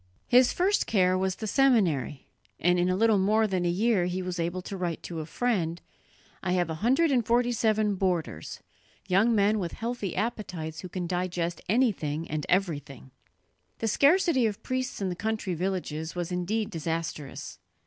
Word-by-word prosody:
His 250 Hz, 0 st, +5 dB
first 390 Hz, +3 st, +1 dB
care 185 Hz, -4 st, +3 dB
was 190 Hz, 0 st, 0 dB
the 220 Hz, -, -6 dB
seminary, 195 Hz, -, +2 dB, 0.3 s
and 175 Hz, +1 st, +3 dB
in 175 Hz, +1 st, +2 dB
a 185 Hz, -, +2 dB
little 220 Hz, 0 st, +3 dB
more 215 Hz, +3 st, +3 dB
than 185 Hz, -4 st, -1 dB
a -, -, +2 dB
year 200 Hz, +1 st, +2 dB
he 180 Hz, +1 st, -2 dB
was 180 Hz, -1 st, -4 dB
able 175 Hz, +2 st, -2 dB
to 195 Hz, -, -6 dB
write 175 Hz, -3 st, -3 dB
to 170 Hz, -2 st, -5 dB
a 155 Hz, -, -5 dB
friend: 175 Hz, -5 st, -1 dB, 0.6 s
"I 180 Hz, -1 st, -1 dB
have 175 Hz, -3 st, +1 dB
a 155 Hz, -, -6 dB
hundred 270 Hz, +8 st, +3 dB
and 250 Hz, -3 st, +3 dB
forty 240 Hz, +2 st, +2 dB
seven 215 Hz, -2 st, +1 dB
boarders, 175 Hz, -, -2 dB, 0.5 s
young 200 Hz, +5 st, +3 dB
men 210 Hz, +1 st, +3 dB
with 175 Hz, -3 st, -3 dB
healthy 230 Hz, -5 st, -4 dB
appetites 175 Hz, -8 st, -3 dB
who 180 Hz, -, -7 dB
can 180 Hz, 0 st, -4 dB
digest 175 Hz, -1 st, -2 dB
anything 180 Hz, -, +1 dB
and 150 Hz, -1 st, -3 dB
everything." 145 Hz, -8 st, -1 dB, 0.7 s
The 225 Hz, -, -2 dB
scarcity 285 Hz, -, +4 dB
of 205 Hz, -2 st, -5 dB
priests 255 Hz, -3 st, -3 dB
in 190 Hz, -, 0 dB
the 180 Hz, -, -3 dB
country 215 Hz, -1 st, -2 dB
villages 170 Hz, -3 st, -3 dB
was 175 Hz, 0 st, -3 dB
indeed 205 Hz, +5 st, -1 dB
disastrous. 165 Hz, -3 st, -4 dB
185 Hz, 175 wpm, -28 LUFS, 170-225 Hz, 0.7 s, His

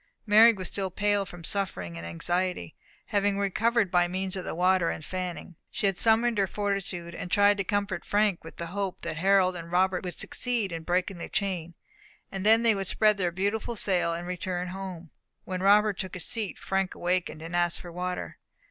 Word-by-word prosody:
Mary 220 Hz, +2 st, +8 dB
was 190 Hz, -5 st, -4 dB
still 195 Hz, -2 st, -2 dB
pale 205 Hz, +1 st, 0 dB
from 175 Hz, -1 st, -11 dB
suffering 185 Hz, -, -3 dB
and 85 Hz, 0 st, -7 dB
anxiety; 175 Hz, -, -2 dB, 0.3 s
having 205 Hz, -1 st, +1 dB
recovered 210 Hz, +1 st, +1 dB
by 175 Hz, -1 st, +3 dB
means 185 Hz, +1 st, -3 dB
of 185 Hz, -, -4 dB
the -, -, -5 dB
water 180 Hz, 0 st, +3 dB
and 155 Hz, -, -5 dB
fanning, 180 Hz, -1 st, -5 dB
she -, -, -3 dB
had 195 Hz, -1 st, +2 dB
summoned 225 Hz, +2 st, +4 dB
her 195 Hz, -, +2 dB
fortitude 195 Hz, -4 st, -3 dB
and 180 Hz, -, -6 dB
tried 205 Hz, +1 st, +5 dB
to 200 Hz, -, -2 dB
comfort 200 Hz, -2 st, -2 dB
Frank 205 Hz, -3 st, +1 dB
with 165 Hz, -, -11 dB
the 170 Hz, -, -4 dB
hope 200 Hz, -2 st, -3 dB
that -, -, -4 dB
Harold 185 Hz, +1 st, +3 dB
and 170 Hz, -1 st, -8 dB
Robert 185 Hz, +1 st, +2 dB
would 180 Hz, -2 st, -6 dB
succeed 235 Hz, -6 st, -1 dB
in 165 Hz, -1 st, -4 dB
breaking 180 Hz, +2 st, -1 dB
the -, -, -6 dB
chain, 175 Hz, -5 st, -2 dB, 0.6 s
and 195 Hz, -1 st, -4 dB
then 225 Hz, +2 st, +5 dB
that 230 Hz, -, +4 dB
they -, -, +6 dB
would 195 Hz, -2 st, -3 dB
spread 215 Hz, 0 st, +3 dB
their 180 Hz, -2 st, +1 dB
beautiful 205 Hz, +6 st, -2 dB
sail, 180 Hz, -5 st, +1 dB
and 170 Hz, +1 st, -4 dB
return 180 Hz, 0 st, -3 dB
home. 180 Hz, -3 st, -7 dB, 0.3 s
When 185 Hz, -1 st, -4 dB
Robert 205 Hz, +1 st, +4 dB
took 190 Hz, -1 st, -4 dB
his 180 Hz, -, -2 dB
seat, 220 Hz, -5 st, -1 dB
Frank 190 Hz, -1 st, -1 dB
awakened, 175 Hz, -3 st, -2 dB
and 165 Hz, +1 st, -5 dB
asked 175 Hz, -1 st, +1 dB
for 175 Hz, -, -9 dB
water. 180 Hz, +1 st, -4 dB
185 Hz, 200 wpm, -28 LUFS, 175-205 Hz, 0.6 s, Mary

